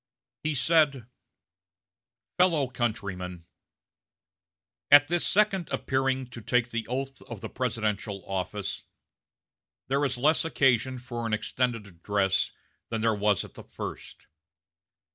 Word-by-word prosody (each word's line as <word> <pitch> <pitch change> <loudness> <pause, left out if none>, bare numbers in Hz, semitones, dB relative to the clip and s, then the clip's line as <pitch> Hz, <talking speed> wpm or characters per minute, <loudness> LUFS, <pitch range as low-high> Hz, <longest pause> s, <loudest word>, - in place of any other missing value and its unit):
He 155 -1 -1
said: 140 -2 +3 1.3
"FELLOW 165 -8 +4
COUNTRYMEN: 95 -8 -3 1.4
At 145 0 +8
this 175 0 +1
second 195 -4 +2
appearing 130 0 0
to 120 - -8
take 125 +2 +1
the 115 -1 -3
oath 135 +2 -4
of 115 -5 -7
the - - -5
presidential 105 -6 -2
office, 95 +1 -3 1.1
there 140 +2 +2
is 130 -3 0
less 150 +5 +3
occasion 130 -5 +2
for 120 -2 -5
an 110 - -2
extended 115 +1 -1
address 95 +1 0 0.4
than 115 -1 -2
there 115 0 +3
was 105 -2 +1
at - - -14
the - - -11
first. - - -8
120 Hz, 120 wpm, -28 LUFS, 105-135 Hz, 1.4 s, At